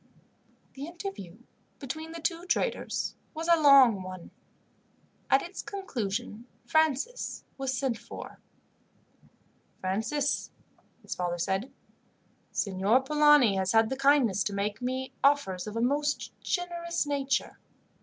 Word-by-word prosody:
The 280 Hz, +2 st, -7 dB
interview 340 Hz, -, -7 dB, 0.4 s
between 315 Hz, +4 st, -6 dB
the 335 Hz, -, -7 dB
two 335 Hz, +1 st, -2 dB
traders -, -, -1 dB, 0.2 s
was 325 Hz, +2 st, -4 dB
a 340 Hz, -, +7 dB
long 265 Hz, -8 st, +7 dB
one. 185 Hz, -1 st, -9 dB, 1.0 s
At 270 Hz, -, +4 dB
its 355 Hz, +2 st, -6 dB
conclusion 235 Hz, -, -4 dB, 0.2 s
Francis 315 Hz, -, 0 dB
was 265 Hz, -1 st, -2 dB
sent 250 Hz, -3 st, -1 dB
for. 235 Hz, -, -10 dB, 1.4 s
"Francis," 225 Hz, +10 st, -1 dB, 0.5 s
his -, -, -4 dB
father 175 Hz, -1 st, -2 dB
said, 190 Hz, +8 st, -1 dB, 0.8 s
"Signor 200 Hz, +5 st, +2 dB
Polani 295 Hz, -7 st, +5 dB
has 190 Hz, +1 st, 0 dB
had 225 Hz, +1 st, +4 dB
the -, -, 0 dB
kindness 270 Hz, -8 st, +3 dB
to 205 Hz, -, -2 dB
make 205 Hz, +3 st, -2 dB
me 260 Hz, +1 st, -3 dB
offers 270 Hz, -10 st, +2 dB
of 210 Hz, -, -6 dB
a 230 Hz, -, 0 dB
most 290 Hz, +4 st, 0 dB
generous 340 Hz, -2 st, -2 dB
nature." 275 Hz, -2 st, -1 dB
265 Hz, 120 wpm, -29 LUFS, 210-300 Hz, 1.4 s, a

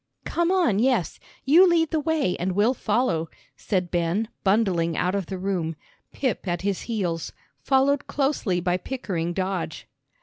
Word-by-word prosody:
"Come 340 Hz, +1 st, 0 dB
on, 340 Hz, -, +2 dB
yes. 240 Hz, -, +1 dB, 0.3 s
You 335 Hz, +7 st, +7 dB
lead 330 Hz, -2 st, +2 dB
the 320 Hz, -, +1 dB
way 300 Hz, -, 0 dB
and 185 Hz, +1 st, -1 dB
we'll 210 Hz, +6 st, +3 dB
follow," 205 Hz, -10 st, 0 dB, 0.3 s
said 180 Hz, -4 st, -2 dB
Ben, 175 Hz, +6 st, 0 dB
bundling 190 Hz, -5 st, +2 dB
out 180 Hz, +1 st, +1 dB
of 195 Hz, -4 st, -2 dB
the 190 Hz, -, -4 dB
room, 180 Hz, -4 st, -2 dB, 0.4 s
Pip 250 Hz, -7 st, -2 dB
at 175 Hz, 0 st, -2 dB
his 200 Hz, -2 st, -1 dB
heels, 175 Hz, -8 st, -2 dB, 0.3 s
followed 275 Hz, +1 st, +2 dB
closely 270 Hz, -10 st, 0 dB
by 180 Hz, 0 st, 0 dB
Pickering 185 Hz, -6 st, -3 dB
Dodge. 185 Hz, -1 st, -3 dB
200 Hz, 155 wpm, -25 LUFS, 175-265 Hz, 0.4 s, You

